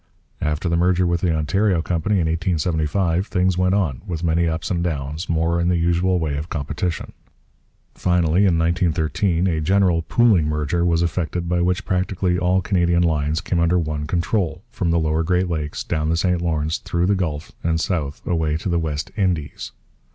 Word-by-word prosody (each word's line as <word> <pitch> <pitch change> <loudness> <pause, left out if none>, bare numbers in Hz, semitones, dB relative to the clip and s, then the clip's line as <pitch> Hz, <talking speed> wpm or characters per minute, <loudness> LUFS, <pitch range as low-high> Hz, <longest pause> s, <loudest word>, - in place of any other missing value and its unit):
After 75 +3 -1
the 85 - +1
merger 90 +1 +2
with 85 -1 0
the 90 - +1
Ontario 85 +3 +1
Company 90 +5 0
in 90 -4 +2
1875 85 +2 0
things 90 -1 +1
went 90 +1 +2
on, 80 -11 -1
with 85 -2 -4
many 85 0 +2
ups 80 +3 -2
and 85 -1 0
downs, 75 0 -3
more 85 +1 +1
in 85 - +1
the 90 -1 +2
usual 85 +2 +2
way 80 -4 -1
of 75 +3 -5
competition. 75 +2 -3 0.8
Finally, 90 +2 +2
in 85 -3 +2
1913, 85 +1 +1
a 80 -4 0
general 90 0 +2
'pooling 100 -4 +3
merger' 75 +3 -1
was 85 -1 +2
effected 85 0 -2
by 90 0 +1
which 90 +1 0
practically 90 -1 0
all 90 +1 +2
Canadian 85 -2 +2
lines 80 0 0
came 90 -1 -1
under 85 +1 +3
one 75 -3 -2
control, 85 0 -1
from 95 -7 -2
the 85 - +2
lower 80 0 +1
Great 90 +3 +1
Lakes, 75 -3 -3
down 80 -2 -1
the 85 - +1
St 90 0 +1
Lawrence, 80 -2 -1
through 85 +1 -1
the 100 - +3
Gulf, 80 -6 -3
and 80 -1 +1
south 80 -5 -3
away 80 -3 0
to 85 - -4
the 85 -1 +1
West 75 -2 -3
Indies. 90 -8 -2
85 Hz, 185 wpm, -21 LUFS, 80-90 Hz, 0.8 s, pooling